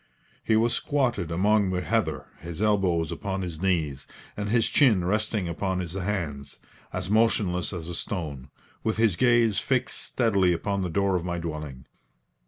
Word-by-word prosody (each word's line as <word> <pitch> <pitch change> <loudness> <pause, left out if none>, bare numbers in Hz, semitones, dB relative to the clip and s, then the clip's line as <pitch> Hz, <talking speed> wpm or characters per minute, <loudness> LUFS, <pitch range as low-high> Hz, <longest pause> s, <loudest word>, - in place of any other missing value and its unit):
He 110 - +2
was 115 +2 +3
squatted 125 - 0
among 100 +4 +2
the 90 -1 -1
heather, - - -1
his 85 0 -8
elbows 95 -6 +2
upon 95 -1 -3
his 85 -3 -6
knees, 80 -8 0 0.3
and 105 0 -3
his 115 0 +3
chin 110 -11 +4
resting 105 0 0
upon 95 +2 -2
his 85 -2 -4
hands, 90 -8 -3 0.3
as 90 - -3
motionless 105 -5 +2
as 85 -4 -6
a 85 - -5
stone, 75 -8 -4 0.3
with 110 - 0
his 110 -5 +3
gaze 120 -2 +3
fixed 130 -1 -1
steadily 100 -7 +2
upon 100 +4 -1
the 90 - -2
door 100 +2 +1
of 90 - -1
my 85 -1 -2
dwelling. 75 -6 -6
95 Hz, 165 wpm, -26 LUFS, 85-110 Hz, 0.3 s, chin